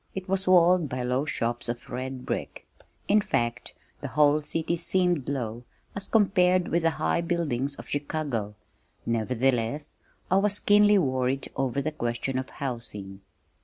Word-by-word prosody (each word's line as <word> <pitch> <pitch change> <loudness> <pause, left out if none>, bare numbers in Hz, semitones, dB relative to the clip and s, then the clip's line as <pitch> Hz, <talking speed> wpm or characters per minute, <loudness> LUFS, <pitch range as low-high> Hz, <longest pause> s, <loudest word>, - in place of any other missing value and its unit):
It 190 0 -5
was 190 0 0
walled 180 -3 +5
by 125 0 -3
low 125 +3 0
shops 120 -6 0
of 120 0 -5
red 130 +1 -5
brick - - -5 0.4
in 210 +1 +4
fact, 120 - -2 0.2
the 140 - -5
whole 145 +3 +3
city 165 +3 -1
seemed 175 -4 +1
low 120 -4 -3 0.3
as 200 -1 -4
compared 185 -4 +3
with 170 - +1
the 165 - +3
high 80 - +1
buildings 145 -6 -1
of - - -10
Chicago, 140 -8 -3 0.5
nevertheless 125 +4 0 0.4
I 190 - +5
was 205 +1 +4
keenly 205 0 +5
worried 130 -4 0
over 135 +1 -1
the 155 - -1
question 130 -1 -2
of 130 - -6
housing. 110 -7 -5
140 Hz, 150 wpm, -27 LUFS, 120-175 Hz, 0.5 s, walled